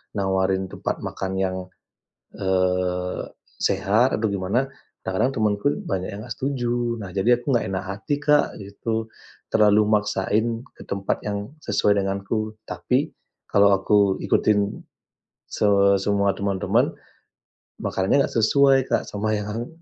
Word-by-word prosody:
nawarin 95 -1 0
tempat - - -3
makan 95 - -4
yang, 95 -1 0 0.8
eee, 90 -1 0 0.4
sehat 115 +7 +2
atau 110 - 0
gimana 100 +7 0 0.4
kadang-kadang 95 +8 0
temanku 105 0 0 0.2
banyak 95 -2 -2
yang 100 - -6
nggak 120 - -5
setuju. 120 -3 -1
Nah, 95 - -7
jadi 115 +5 +3
aku - - -17
nggak 120 - +1
enak 95 -1 -3
hati, 100 +8 -3
Kak, 150 0 +2
gitu. 110 +3 -3 0.4
Terlalu 105 -1 +5
maksain 105 +2 +1
ke - - -12
tempat 100 0 -2
yang 100 +2 -3
sesuai 105 - +2
denganku. 100 +3 -2
Tapi - - 0 0.4
kalau 100 0 +5
aku 100 0 +3
ikutin 105 -1 +1 0.7
se - - -2 0.4
semua 100 0 +2
teman-teman, 100 -2 +1 0.9
makanannya 95 +9 +2
nggak - - -11
sesuai, 135 +5 +5
Kak, - - +2
sama 105 +1 -2
yang 105 +3 -4
100 Hz, 125 wpm, -23 LUFS, 95-110 Hz, 0.9 s, Terlalu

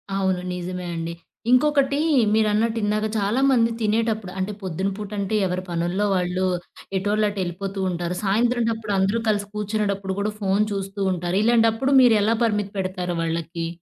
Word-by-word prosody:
అవును. 190 -2 0
నిజమే 180 0 -5
అండి. 165 0 -4 0.4
ఇంకొకటీ, 280 +1 +3 0.3
మీరన్నట్టు 220 +1 +2
ఇందాక, 210 +1 +1
చాలామంది 230 +3 +3
తినేటప్పుడు 215 -2 0
అంటే 190 +2 -1
పొద్దున 190 +1 -2
పూటంటే 210 0 -3
ఎవరి 180 0 -3
పనుల్లో 175 +4 0
వాళ్ళు 180 +1 0 0.5
ఎటోళ్ళటేళ్ళిపోతూ 195 -1 -1
ఉంటారు, 175 0 -3
సాయంత్రంటప్పుడు 225 0 +1
అందరూ 195 +4 +1
కలిసి 205 -1 0
కూర్చునేటప్పుడు 200 -2 -2
గూడా, 210 +1 -1
ఫోను 195 +1 +2
చూస్తూ 195 0 -5
ఉంటారు. 175 +1 -2
ఇలాంటప్పుడు 230 +3 +3
మీరెలా 225 -2 +4
పరిమితి 210 -3 -1
పెడతారు 185 -2 -2
వాళ్ళకి? 165 0 -3
200 Hz, 125 wpm, -23 LUFS, 185-220 Hz, 0.5 s, మీరెలా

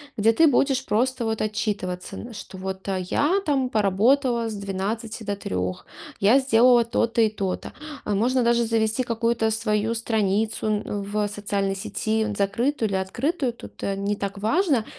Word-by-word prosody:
где 220 +1 +4
ты 320 +8 +5
будешь 270 -1 +2
просто 245 +2 0
вот 220 0 -1
отчитываться, 210 -4 -3
н 235 0 -8
что 205 -2 -9
вот 190 +1 -6
я 195 - +1
там 270 -5 +1
поработала 230 +4 +2
с - - -5
12 210 +3 -4
до 205 -1 -2
3, 90 - -3 0.4
я 220 +7 +6
сделала 245 -2 +5
то-то 230 0 +1
и 220 - +4
то-то. 195 -3 -4 0.3
А 210 - 0
можно 245 +5 +2
даже 235 0 +3
завести 225 +2 +1
какую-то 230 -1 0
свою 220 0 0
страницу, 220 -1 0
н 210 -1 -1
в 205 +1 -1
социальной 200 -1 -2
сети, 220 +3 -1
н 215 -1 -3
закрытую 220 +5 0
или 195 - -1
открытую, 255 - -1
тут, 235 - -12
э, 195 - -1
не 200 +1 -1
так 200 -1 -4
важно. 260 - +1
220 Hz, 165 wpm, -24 LUFS, 200-235 Hz, 0.4 s, я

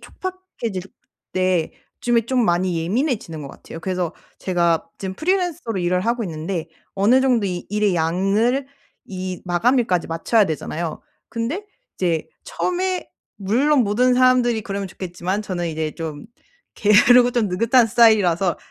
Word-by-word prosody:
촉박해질 370 - -6 0.5
때 185 -3 +1 0.3
요즘에 240 -1 +2
좀 250 -1 +2
많이 175 -2 +1
예민해지는 205 - -2
것 140 - -7
같아요. 165 - -11
그래서 180 -1 -2 0.2
제가 170 -3 +1
지금 190 -1 -5
프리랜서로 330 - -1
일을 180 +1 +1
하고 235 +4 0
있는데 165 -1 -4 0.3
어느 215 +7 +4
정도 245 -6 +2
이 180 -1 -4
일의 205 -3 +1
양을 195 +11 +1 0.4
이 185 -2 -5
마감일까지 190 +1 +1
맞춰야 185 +7 +2
되잖아요. 160 +1 -4 0.3
근데 265 - -3 0.3
이제 170 -4 -1 0.2
처음에 365 0 -2 0.3
물론 255 +9 +2
모든 245 +4 +2
사람들이 250 -2 +3
그러면 200 0 -4
좋겠지만 185 +2 -4
저는 175 -4 -3
이제 155 -1 -2
좀 155 -3 -6 0.5
게으르고 245 +4 +5
좀 235 -4 +1
느긋한 230 +6 +3
스타일이라서 200 -6 +4
200 Hz, 325 characters per minute, -21 LUFS, 175-245 Hz, 0.5 s, 게으르고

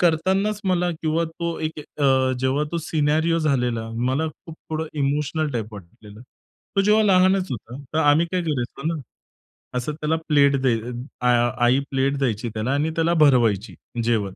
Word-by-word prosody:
करतांनाच 190 +5 +1
मला 180 -1 +1
किंवा 160 +1 +1
तो 165 +1 -4
एक 155 0 -3
अ, 135 -3 +1
जेव्हा 130 +3 +1
तो 170 - 0
सिनेरिओ 160 +2 +1
झालेला, 125 -7 0
मला 130 +7 0
खूप 165 +2 -12 0.2
थोडं 160 0 -2
इमोशनल 150 +2 0
टाइप 110 -2 -4
वाटलेलं. 105 +3 -13 0.6
तो - - +5
जेव्हा 210 +2 +4
लहानच 190 -1 +3
होता. 120 +1 -6 0.2
तर 160 - +2
आम्ही 155 +2 +4
काय 185 - +1
करायचो 135 -5 -3
ना, 155 - -5 0.8
असं 125 +5 -3
त्याला 155 +1 -1
प्लेट 140 -2 +4
द्यय 120 -4 +2
अ, 125 +1 -6
आ 120 0 +3 0.2
आई 125 +3 +4
प्लेट 135 +1 +1
द्यायची 120 -4 -1
त्याला 110 +4 -1
आणि 150 +3 0
त्याला 165 +1 +2
भरवायची, 115 -7 +2 0.3
जेवण. 115 -2 +1
145 Hz, 165 wpm, -23 LUFS, 125-165 Hz, 0.8 s, तो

